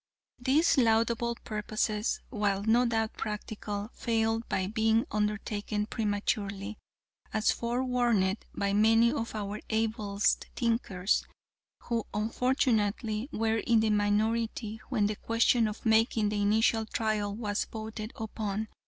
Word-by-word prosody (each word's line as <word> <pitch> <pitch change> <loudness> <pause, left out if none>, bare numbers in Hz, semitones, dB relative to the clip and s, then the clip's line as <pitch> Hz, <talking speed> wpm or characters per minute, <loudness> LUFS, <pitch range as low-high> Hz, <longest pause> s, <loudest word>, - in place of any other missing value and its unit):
"These 275 +5 +3
laudable 230 0 +2
purposes, 215 0 -1
while 205 -4 0
no 235 +3 +4
doubt 225 -1 0
practical, 210 0 -5
failed 225 -1 0
by 190 - 0
being 220 +2 +2
undertaken 210 0 -1
prematurely 205 -2 -2 0.5
as 215 0 +2
forewarned 235 -5 0
by 200 0 -1
many 225 +3 +5
of 230 -6 -3
our 210 0 -4
ablest 220 -2 0
thinkers, 220 -5 +1 0.6
who, 230 -2 -2
unfortunately, 225 0 0
were 225 -2 0
in 230 +1 +3
the 220 -1 +2
minority 215 +1 0
when 225 -6 +1
the 210 0 -1
question 230 0 +2
of 215 +2 -7
making 220 -1 +3
the 205 0 -1
initial 220 +2 +2
trial 215 -2 -1
was 210 -2 -2
voted 220 0 -6
upon. 215 -1 -3
220 Hz, 120 wpm, -29 LUFS, 210-230 Hz, 0.6 s, many